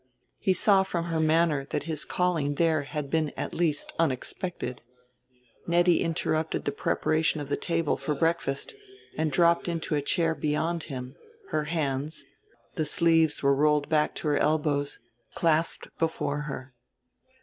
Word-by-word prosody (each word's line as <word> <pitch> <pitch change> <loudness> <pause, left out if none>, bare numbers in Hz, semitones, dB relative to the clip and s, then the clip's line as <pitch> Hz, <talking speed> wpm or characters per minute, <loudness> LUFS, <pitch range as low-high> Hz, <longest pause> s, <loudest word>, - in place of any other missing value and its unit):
He 190 - +2
saw 195 +1 +4
from 175 -3 -2
her 165 - 0
manner 155 -3 +2
that - - -2
his 160 -2 -2
calling 165 -6 0
there 160 -1 +2
had 145 -1 -5
been 160 -2 +1
at - - -4
least 160 -4 0
unexpected. 150 -1 -2 0.9
Nettie 175 0 +4
interrupted 160 -1 -1
the 145 - +1
preparation 155 +2 +1
of 145 -1 -6
the - - +1
table 165 -3 0
for 150 - -2
breakfast, 165 -3 0 0.4
and 155 -1 0
dropped 170 +4 +3
into 165 -2 -2
a 145 - +1
chair 165 +3 +1
beyond 160 +2 -1
him, 130 -2 -7 0.3
her 155 -1 0
hands 150 -2 -2 0.5
the 155 - -1
sleeves 165 -1 +3
were 140 0 +5
rolled 150 +1 +2
back 150 -1 +2
to - - -4
her 145 - +2
elbows 150 -2 +1 0.4
clasped 165 -1 +1
before 150 -3 -1
her. 130 -1 -7
155 Hz, 150 wpm, -27 LUFS, 145-165 Hz, 0.9 s, were